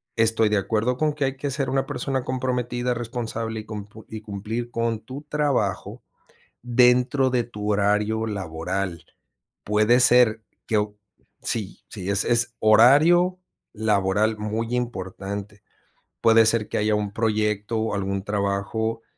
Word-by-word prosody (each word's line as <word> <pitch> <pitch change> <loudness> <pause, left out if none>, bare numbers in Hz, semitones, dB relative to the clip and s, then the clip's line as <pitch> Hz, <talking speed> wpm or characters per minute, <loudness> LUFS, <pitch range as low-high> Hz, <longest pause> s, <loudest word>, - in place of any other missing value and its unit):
Estoy 115 -1 +3
de 105 - +2
acuerdo 110 +5 0
con 155 +1 +1
que 145 -2 -1
hay 135 0 -3
que 145 +1 -3
ser 135 0 -2
una 135 0 0
persona 130 0 -2
comprometida, 125 -1 -2
responsable 115 -1 -4
y - - -15
cump 105 -2 -8
y 110 -1 -8
cumplir 110 +3 -5
con 115 -2 -1
tu 130 +6 -9
trabajo 145 -9 -1 0.6
dentro 125 +2 +3
de 125 -2 +1
tu 105 -3 -6
horario 105 +2 +1
laboral. 95 -2 -4 0.6
Puede 110 +4 +3
ser 120 -3 +5 0.2
que 110 - +1
o 105 0 -2 0.5
sí. 105 -4 -3
Sí 100 -1 -3
sí, - - +2
es 120 0 +2
horario 150 +12 +5 0.4
laboral 105 0 +1
muy 110 +3 -3
importante. 100 -3 -5 0.6
Puede 115 0 +6
ser 110 -1 +2
que - - -2
haya 105 0 +1
un 105 -1 -2
proyecto 105 -1 -1
o 110 -1 -1
algún 100 -1 -2
trabajo 105 +3 -2
110 Hz, 140 wpm, -24 LUFS, 105-125 Hz, 0.6 s, Puede